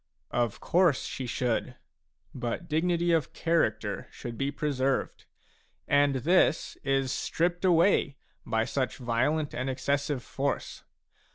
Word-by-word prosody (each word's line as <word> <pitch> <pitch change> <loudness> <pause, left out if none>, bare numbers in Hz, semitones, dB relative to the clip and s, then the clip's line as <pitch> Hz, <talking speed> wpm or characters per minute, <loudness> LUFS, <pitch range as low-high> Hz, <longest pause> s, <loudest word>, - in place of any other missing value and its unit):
" - - -42 0.2
Of 105 - -14
course 175 -5 +3
she 130 - -5
should; 125 +1 -1 0.6
but 120 +8 -4
dignity 170 +2 +1
of 160 -5 +1
character 110 -11 0
should 120 -1 -7
be 135 +3 -1
preserved, 135 -2 -1 0.6
and 145 -1 +3
this 160 +5 +2
is 135 -1 +1
stripped 175 +6 -1
away 170 -5 +3 0.3
by 110 -1 0
such 130 +1 -2
violent 130 +5 0
and 130 +2 -2
exces 140 +2 0
sive 135 -5 -3
force. 140 +5 -3
140 Hz, 125 wpm, -28 LUFS, 125-165 Hz, 0.6 s, course